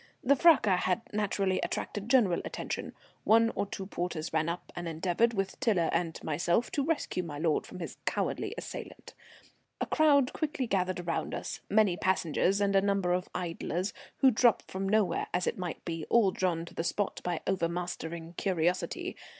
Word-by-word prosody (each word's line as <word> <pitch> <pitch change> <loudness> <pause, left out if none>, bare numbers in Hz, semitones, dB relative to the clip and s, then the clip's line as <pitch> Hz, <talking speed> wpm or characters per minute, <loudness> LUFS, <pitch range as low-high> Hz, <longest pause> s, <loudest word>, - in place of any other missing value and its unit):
The 280 +3 +5
fracas 260 - +5
had 185 +5 +1
naturally 195 -2 0
attracted 205 +1 -3
general 220 -10 +4
attention. - - -4 0.3
One 230 +1 +5
or 200 - -1
two 195 - -6
porters 175 -4 -4
ran 160 +1 +1
up 170 +1 -5
and 175 0 -4
endeavoured, 180 +8 +1
with 195 -1 -2
Tiler 205 -10 +2
and 170 -1 -1
myself, 175 +8 +1
to 280 - 0
rescue 290 - -1
my 155 -5 -6
lord 155 0 0
from - - -9
his - - -6
cowardly - - -1
assailant. - - -8 0.7
A - - 0
crowd 285 -4 +4
quickly 300 -4 -2
gathered 185 -4 0
around 170 -1 -2
us, - - -5
many 205 -4 +3
passengers 185 +1 +1
and 200 -1 +2
a 195 - +6
number 195 -3 +1
of 180 +1 -1
idlers, 180 +2 -2 0.3
who 265 -2 +7
drop 235 0 +4
from 195 +1 -4
nowhere, 215 -2 +2
as 180 - +1
it - - -2
might 175 -3 -5
be, 165 -2 -4
all 220 -5 +5
drawn 175 -3 -1
to - - -12
the - - -2
spot 200 +3 -1
by 175 -2 -2
overmastering 170 -2 -3
curiosity. 180 -2 -1
185 Hz, 175 wpm, -30 LUFS, 170-215 Hz, 0.7 s, who